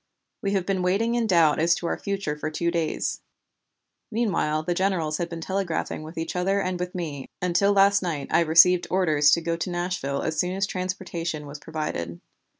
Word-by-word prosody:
We 200 0 -1
have 190 -3 0
been 190 -1 0
waiting 200 +6 +1
in 235 -2 +1
doubt 165 -6 +4
as 170 +1 +4
to 170 - -6
our - - 0
future 195 -7 -2
for 150 +1 -4
two 170 +2 -1
days; 165 -2 -1 0.9
meanwhile 195 -9 0
the 175 - 0
generals 175 -5 0
had 175 -1 -2
been 170 -1 -6
telegraphing 190 -4 -2
with 155 +2 -10
each 165 +1 -3
other 195 +3 +1
and 185 -2 -2
with 180 +1 -4
me, 150 -6 -5
until 180 +3 +2
last 200 0 +5
night 160 -6 -3
I - - +4
received 170 +2 +5
orders 155 -6 +3
to 170 - +4
go 165 0 -1
to 170 - -3
Nashville 175 -6 -2
as 160 -1 -2
soon 180 +1 0
as 195 +1 +1
transportation 180 -4 -4
was 145 +1 -8
provided. 115 - -4
175 Hz, 195 wpm, -25 LUFS, 155-190 Hz, 0.9 s, last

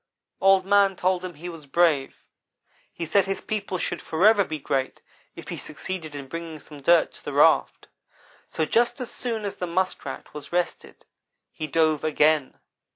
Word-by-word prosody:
"Old 195 -1 +5
man 200 -1 +4
told 185 0 0
him 180 -3 -6
he 165 +4 -8
was 165 -4 -9
brave. 150 -2 +2 0.8
He 170 - -5
said 195 +4 +3
his 195 - -2
people 205 -3 -3
should - - -3
forever 200 +6 +4
be 160 -4 -5
great 135 -2 -2 0.4
if - - -10
he - - -4
succeeded 155 0 -6
in 140 -1 -7
bringing 165 +1 -6
some 145 -1 -13
dirt 170 +3 +4
to - - -14
the - - -5
raft; - - +3 0.6
so 160 - -1
just 240 - +1
as 250 - -4
soon 225 -4 -3
as 200 - -4
the 180 - -3
Muskrat 185 +2 -3
was 150 -1 -9
rested 175 0 -3 0.5
he 155 - -5
dove 155 0 +2
again. 155 - +2
170 Hz, 170 wpm, -25 LUFS, 155-190 Hz, 0.8 s, Old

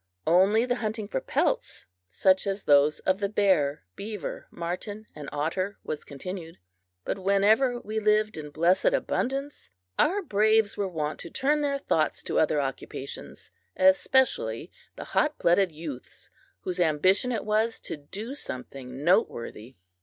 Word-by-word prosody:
Only 195 +8 +4
the 245 0 0
hunting 215 -2 -3
for 130 - -2
pelts, - - -1 0.2
such 185 - +3
as 195 0 -2
those 145 +1 +4
of 190 +1 +1
the 200 -1 -1
bear, 185 - +2
beaver, 210 -1 -6
marten, 195 +5 -5
and 150 -2 -8
otter 175 +7 -2
was 150 - -4
continued. 165 +3 -7 0.5
But - - -2
whenever 210 +6 +3
we 220 -1 -3
lived 215 0 +2
in 150 -1 -6
blessed 170 +5 +2
abundance, 275 - -2 0.3
our 395 +5 +3
braves 215 - +3
were 200 - -1
wont 155 -4 -3
to 170 - -6
turn 295 - +1
their 280 -1 0
thoughts 275 - 0
to - - 0
other - - +2
occupations - - -6 0.3
especially 265 - +3 0.2
the - - -7
hot 300 0 0
blooded 180 +1 +3
youths 150 -5 -9 0.3
whose 180 0 -4
ambition 185 +8 +3
it 225 -4 -2
was 220 +2 +1
to - - -5
do 200 - -7
something 130 - -7
noteworthy. 125 - 0
195 Hz, 145 wpm, -27 LUFS, 155-220 Hz, 0.5 s, Only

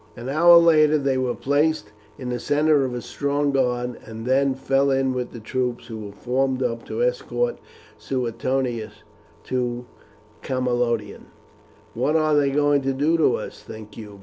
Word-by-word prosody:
An 120 +2 -6
hour 170 +4 +7
later 155 -2 +5
they 135 -2 0
were 125 -1 -1
placed 145 -5 0 0.3
in 130 -3 -6
the 125 0 -2
centre 145 +2 +2
of 125 -1 -4
a 120 - -5
strong 145 0 -1
guard, 125 -2 -1
and 110 0 -9
then 135 +1 +2
fell 135 +1 +1
in 135 -1 +1
with 125 -1 -3
the 120 - -9
troops 125 +2 -3
who 110 -2 -7
were 105 -1 -7
formed 130 +4 -1
up 115 -2 -2
to 480 - -2
escort - - -1 0.4
Suetonius 120 -3 -3 0.4
to 125 -1 -2 0.6
Camalodunum. 120 -4 -2 0.7
"What 150 - 0
are 155 -1 +3
they 145 -1 +3
going 145 0 +2
to 135 0 -1
do 150 +5 +1
to 150 -6 +3
us, - - -7
think 110 -1 -11
you?" 105 -3 -10
130 Hz, 165 wpm, -23 LUFS, 120-145 Hz, 0.7 s, hour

